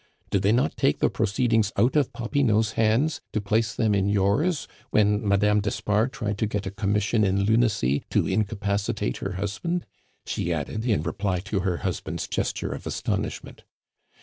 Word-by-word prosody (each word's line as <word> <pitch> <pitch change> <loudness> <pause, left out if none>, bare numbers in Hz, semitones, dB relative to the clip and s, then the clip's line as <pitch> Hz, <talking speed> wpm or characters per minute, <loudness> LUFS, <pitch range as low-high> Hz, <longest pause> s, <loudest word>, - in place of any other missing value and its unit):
Did 100 - +2
they 100 +1 +3
not 120 +3 +1
take - - +2
the - - +1
proceedings 110 0 +1
out 120 +8 +3
of 145 -4 +2
Popinot's 115 -3 +1
hands 115 +9 +1
to 105 - +1
place 110 +2 0
them 110 -3 +2
in 100 0 +1
yours 105 - +1 0.2
when 105 0 +3
Madame 105 +1 +3
d'Espard 105 +3 0
tried 105 -7 -3
to 110 - +1
get 105 -1 -3
a 95 - -3
Commission 105 +2 +1
in 100 0 +2
Lunacy 100 - +2
to - - +2
incapacitate 100 - -1
her 95 - -4
husband?" 110 - -2 0.4
she 85 - -2
added, 85 +8 -3
in 105 -10 +2
reply 95 +2 -1
to 100 +1 -2
her 90 -2 0
husband's 85 -3 -3
gesture - - -2
of - - -6
astonishment. - - -3
105 Hz, 165 wpm, -25 LUFS, 100-110 Hz, 0.4 s, they